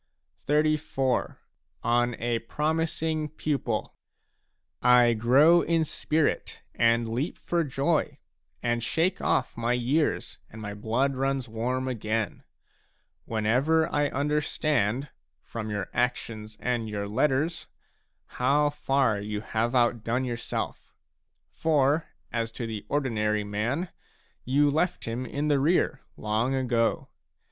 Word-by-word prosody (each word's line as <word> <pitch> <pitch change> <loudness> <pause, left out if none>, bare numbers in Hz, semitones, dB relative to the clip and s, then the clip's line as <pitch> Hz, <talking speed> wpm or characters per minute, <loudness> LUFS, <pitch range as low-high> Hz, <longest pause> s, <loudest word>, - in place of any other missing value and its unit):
Farewell. 155 +1 +2
XXXIV. 135 -5 -1 0.5
ON 120 0 +2
A 120 0 -1
PROMISING 155 +4 -1
PUPIL 135 -7 -1 0.9
I 125 -1 +6
grow 135 +10 +5
in 165 -1 +1
spirit 155 0 -1
and 115 0 +3
leap 125 +8 -2
for 170 -1 0
joy 145 +3 0 0.5
and 120 0 +1
shake 170 - 0
ofF - - +1
my 115 +1 0
years 130 +6 0
and 110 - -11
my 105 -1 -5
blood 115 +6 0
runs 135 -1 -1
warm 125 +4 -2
again, 110 -4 -2 0.8
whenever 125 +9 +2
I 145 0 +2
understand, 145 -3 0 0.3
from 110 -2 -6
your 105 -2 -2
actions 110 -3 -2
and 120 -3 -1
your 100 -1 -3
letters, 150 +9 0 0.6
how 145 +4 +2
far 135 -6 +1
you 105 0 -4
have 115 +3 -1
outdone 120 +1 +1
yourself; 120 -1 -4 0.6
for 150 0 +2 0.3
as 115 -1 -1
to 115 - -4
the 110 -2 -5
ordinary 105 -7 0
man, 115 - -2 0.6
you 140 +3 +3
left 175 +5 0
him 120 +3 -3
in 145 +5 -2
the 145 -2 +3
rear 145 -1 +2 0.2
long 110 +5 0
ago. 120 -3 0
125 Hz, 120 wpm, -27 LUFS, 115-150 Hz, 0.9 s, I